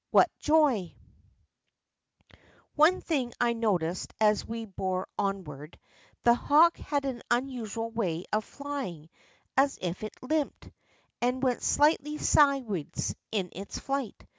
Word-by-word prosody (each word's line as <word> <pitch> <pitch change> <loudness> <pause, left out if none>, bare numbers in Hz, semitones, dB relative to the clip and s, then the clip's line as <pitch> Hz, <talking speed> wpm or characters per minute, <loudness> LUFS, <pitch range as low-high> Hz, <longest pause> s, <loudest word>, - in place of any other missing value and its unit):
What - - +5
joy! 290 - +2 1.8
One 315 +5 +4
thing 265 -7 -1
I 240 -1 +3
noticed 185 -7 -1
as 210 -1 +3
we 230 0 -5
bore 190 -2 -3
onward. 170 -7 -4 0.5
The 235 - +6
hawk 310 +7 +4
had 285 -2 -2
an 255 -3 -3
unusual 240 -3 -2
way 185 -7 -2
of 215 0 +2
flying 255 - -6 0.4
as 275 +1 +3
if 180 0 -4
he 215 - -4
limped, 305 +2 -2 0.5
and 250 +2 0
went 250 -2 +1
slightly 300 0 +2
sideways 265 - +2 0.2
in 195 -5 -1
his 195 +3 -7
flight. 275 -5 -4
235 Hz, 120 wpm, -29 LUFS, 195-280 Hz, 1.8 s, The